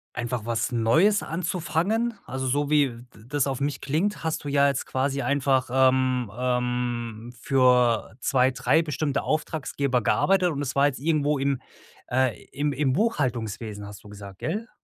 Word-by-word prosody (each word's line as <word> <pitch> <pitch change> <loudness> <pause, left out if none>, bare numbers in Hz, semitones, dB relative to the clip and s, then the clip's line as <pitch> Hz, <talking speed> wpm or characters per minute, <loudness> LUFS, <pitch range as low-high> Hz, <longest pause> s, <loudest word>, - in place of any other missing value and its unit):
einfach 120 -2 -3
was 115 +2 -1
Neues 160 - +3
anzufangen? 180 +7 -1
Also, 130 0 -4
so 145 +3 0
wie 145 -3 +3
d 120 0 -12 0.2
das 145 0 0
auf 135 -1 -2
mich 145 0 -2
klingt, 165 +9 -1
hast 160 -1 -2
du 145 - -4
ja 140 0 +4
jetzt 140 -2 -1
quasi 135 +1 -1
einfach, 135 -1 +1
ähm, 130 -3 +2
ähm, 125 -2 -2
für 125 -4 +3
2, 130 0 +3
3 130 +5 +2
bestimmte 145 -2 -2
Auftraggeber 140 -4 -1
gearbeitet 185 - +2
und 145 -3 -3
es 140 -2 -3
war 140 +1 +4
jetzt 140 - -1
irgendwo 150 -1 +1
im 135 -1 0 0.5
äh, 130 -1 0
im 145 +1 -1
im 135 -1 +1
Buchhaltungswesen, 115 - -2
hast 100 0 -11
du 105 - -12
gesagt, 100 -2 -11
gell? 225 +4 -3
135 Hz, 160 wpm, -25 LUFS, 125-150 Hz, 0.5 s, ja